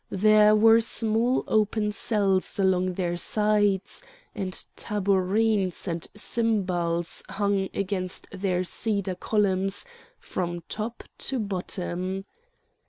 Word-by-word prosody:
There 215 +2 +5
were 225 +1 +6
small 230 +2 +1
open 215 0 +1
cells 200 -3 0
along 185 -1 +2
their 175 -1 -2
sides, 205 0 +1 0.3
and 195 -5 -3 0.2
tabourines 200 -1 0
and 170 -1 -3
cymbals 180 -7 0
hung 200 -1 0
against 185 -2 -3
their 185 -2 -1
cedar 200 0 -1
columns 195 -1 0 0.3
from 175 -1 -4
top 225 +2 -5 0.2
to 270 - -1
bottom. 190 -2 -3
200 Hz, 100 wpm, -26 LUFS, 185-215 Hz, 0.3 s, were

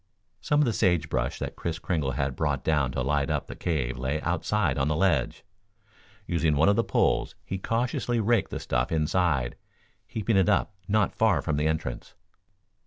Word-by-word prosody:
Some 150 0 +2
of - - +4
the 120 - 0
sage 90 -7 +1
brush - - -1
that - - -5
Kris 85 -1 -3
Kringle 80 -6 -1
had 65 +1 -1
brought 75 -4 -1
down 75 -5 +1
to 65 - -1
light 70 0 0
up - - -1
the - - -8
cave 65 -8 -2
lay 70 +4 -1
outside 90 -3 0
on 65 - +1
the 80 - +1
ledge. 80 -4 +1 0.8
Using 85 -4 +1
one 80 +7 +4
of 100 - +4
the 115 - +2
poles, - - +1
he 95 - -4
cautiously 120 +2 -1
raked 115 +2 +2
the - - -4
stuff - - -1
inside, 75 -5 +1 0.5
heaping 110 -3 0
it 95 +1 +4
up 105 +1 +1
not 105 0 +2
far 110 -2 +3
from 80 - -1
the 75 +1 +1
entrance. 80 -6 -3
80 Hz, 185 wpm, -27 LUFS, 70-100 Hz, 0.8 s, of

